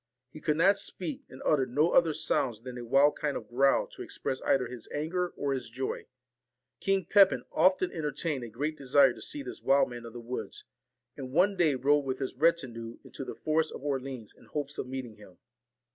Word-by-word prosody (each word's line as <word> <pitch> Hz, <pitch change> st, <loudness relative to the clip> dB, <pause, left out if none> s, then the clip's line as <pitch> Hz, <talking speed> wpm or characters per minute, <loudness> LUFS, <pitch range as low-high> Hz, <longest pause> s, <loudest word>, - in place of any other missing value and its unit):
He 155 Hz, -, -11 dB
could 150 Hz, 0 st, +1 dB
not 195 Hz, +4 st, +4 dB
speak, 165 Hz, -6 st, -4 dB
and 130 Hz, -, -11 dB
uttered 135 Hz, -4 st, +2 dB
no 150 Hz, +6 st, +3 dB
other 165 Hz, -2 st, +5 dB
sounds 130 Hz, -7 st, 0 dB
than 125 Hz, 0 st, -8 dB
a 120 Hz, -, -6 dB
wild 135 Hz, +5 st, +4 dB
kind 145 Hz, -2 st, -1 dB
of -, -, -9 dB
growl 135 Hz, +3 st, +3 dB
to -, -, -11 dB
express 130 Hz, -, -3 dB
either 135 Hz, -2 st, +2 dB
his 120 Hz, -1 st, -8 dB
anger 175 Hz, +5 st, -1 dB
or 140 Hz, -1 st, 0 dB
his 125 Hz, -3 st, -4 dB
joy. 130 Hz, +3 st, -4 dB, 0.7 s
King 195 Hz, -2 st, +1 dB
Pepin 195 Hz, +1 st, +5 dB
often 185 Hz, 0 st, +3 dB
entertained 150 Hz, -3 st, -2 dB
a 120 Hz, -, -6 dB
great 145 Hz, +8 st, -3 dB
desire 135 Hz, -2 st, +4 dB
to -, -, -12 dB
see 290 Hz, -1 st, -4 dB
this -, -, -7 dB
wild 135 Hz, -2 st, +3 dB
man 120 Hz, -1 st, -7 dB
of 115 Hz, -, -11 dB
the 120 Hz, -, -7 dB
woods; 120 Hz, +2 st, -6 dB, 0.5 s
and 130 Hz, -2 st, -7 dB
one 185 Hz, +7 st, +3 dB
day 160 Hz, -6 st, +3 dB
rode 145 Hz, +3 st, +3 dB
with 130 Hz, -1 st, -2 dB
his 130 Hz, -1 st, -4 dB
retinue 125 Hz, -7 st, 0 dB
into -, -, -8 dB
the -, -, -7 dB
forest 155 Hz, 0 st, 0 dB
of -, -, -8 dB
Orleans 135 Hz, -5 st, -4 dB
in -, -, -19 dB
hopes 145 Hz, -1 st, -4 dB
of -, -, -3 dB
meeting 130 Hz, -4 st, -6 dB
him. 105 Hz, -4 st, -16 dB
140 Hz, 205 wpm, -30 LUFS, 125-155 Hz, 0.7 s, other